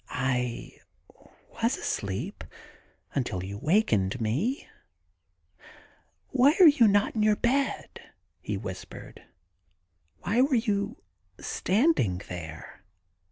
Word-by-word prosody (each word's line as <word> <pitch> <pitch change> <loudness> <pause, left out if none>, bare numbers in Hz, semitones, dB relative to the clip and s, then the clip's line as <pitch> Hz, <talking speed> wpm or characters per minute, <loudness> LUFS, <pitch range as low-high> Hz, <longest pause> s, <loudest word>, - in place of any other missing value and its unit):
*I 125 -2 -2 0.8
was - - +2
asleep 95 -1 -4 0.7
until 90 -1 -2
you 100 +2 -6
wakened 130 - +1
me. 145 - -1 1.6
Why 280 +5 +4
are 365 - +10
you 270 -7 +6
not 205 0 +2
in 220 - 0
your 210 0 +4
bed? 250 +1 -1 0.2
' 85 -2 -47
he 105 - 0
whispered. 95 -2 -9 0.5
* 85 -2 -45
Why 225 +6 +2
were 270 0 +3
you 215 0 -1 0.4
standing 200 - +1
there? 80 0 -8
130 Hz, 105 wpm, -27 LUFS, -, 1.6 s, are